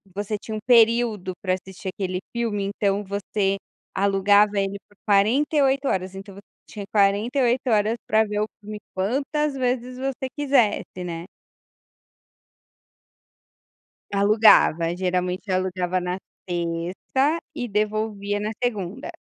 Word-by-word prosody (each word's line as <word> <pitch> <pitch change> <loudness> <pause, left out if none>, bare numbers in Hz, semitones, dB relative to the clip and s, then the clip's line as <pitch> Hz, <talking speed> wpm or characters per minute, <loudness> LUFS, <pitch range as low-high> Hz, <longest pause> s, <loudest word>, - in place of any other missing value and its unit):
você 205 +1 -2
tinha 220 - -6
um - - -4
período 230 -5 +4
pra 185 -2 0
assistir 190 0 -6
aquele 185 -1 -3 0.2
filme, 220 -4 -1
então 200 0 0
você 195 0 -1 0.4
alugava 200 +1 +3
ele 195 0 -1
por 205 - -25
48 270 +7 +3
horas, 190 0 -1
então 195 +1 -9
você 200 - -12 0.3
tinha 205 -2 -7
48 235 +6 +2
horas 215 0 +2
pra 220 0 +4
ver 210 0 -3
o - - +1
filme 210 0 -8 0.2
quantas 275 +9 0
vezes 250 -1 -2
você 265 0 -3
quisesse, 250 -10 +1
né. 170 -1 -5 2.9
Alugava. 200 -5 +5
Geralmente 180 +1 -1
alugava 185 -1 0
na 180 +1 -3 0.3
sexta 175 - -1 0.2
e 250 -5 -3
devolvia 210 -1 -1
na 210 +1 -2
segunda. 230 - -3
205 Hz, 120 wpm, -24 LUFS, 190-235 Hz, 2.9 s, Alugava